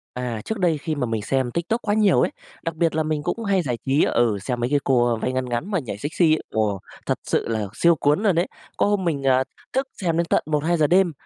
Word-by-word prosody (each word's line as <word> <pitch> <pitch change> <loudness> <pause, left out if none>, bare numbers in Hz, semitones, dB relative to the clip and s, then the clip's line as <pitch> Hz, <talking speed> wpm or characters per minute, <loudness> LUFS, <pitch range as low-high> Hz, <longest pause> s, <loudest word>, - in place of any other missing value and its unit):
À, 125 -3 -3
trước 220 - -3
đây 170 -4 +2
khi 155 +2 -3
mà 140 - -1
mình 115 -2 -2
xem 130 +2 0
TikTok 175 - -1
quá 205 - 0
nhiều 210 -3 +4
ấy, - - +1 0.3
đặc 165 -1 -3
biệt 165 -1 +1
là 160 - +1
mình 155 -1 -2
cũng 230 - -2
hay 200 -3 +2
giải 125 -7 -2
trí 135 +3 +3
ừ, 115 -4 +2
xem 120 +4 -3
mấy 120 +1 0
cái 145 0 +3
cô, 125 -3 +3
ơ, 120 - +1
váy 125 +3 -2
ngắn 130 0 -1
ngắn 120 - -3
mà 180 - +1
nhảy 115 -8 -6
sexy, 155 - +2
ồ, 105 -3 0 0.3
thật - - -1
sự - - 0
là 110 -3 -1
siêu 170 +7 +4
cuốn 150 +6 +1
luôn 195 -6 +3
đấy! 175 +3 +2 0.3
Có - - +3
hôm 205 -2 +1
mình, 145 -5 -1
ờ, 130 -1 +4 0.3
thức 265 +1 0
xem 165 -3 0
đến 170 - +2
tận - - +2
1:00-2:00 155 +1 +1
đêm, 180 +2 +4
150 Hz, 260 wpm, -23 LUFS, 125-175 Hz, 0.3 s, nhiều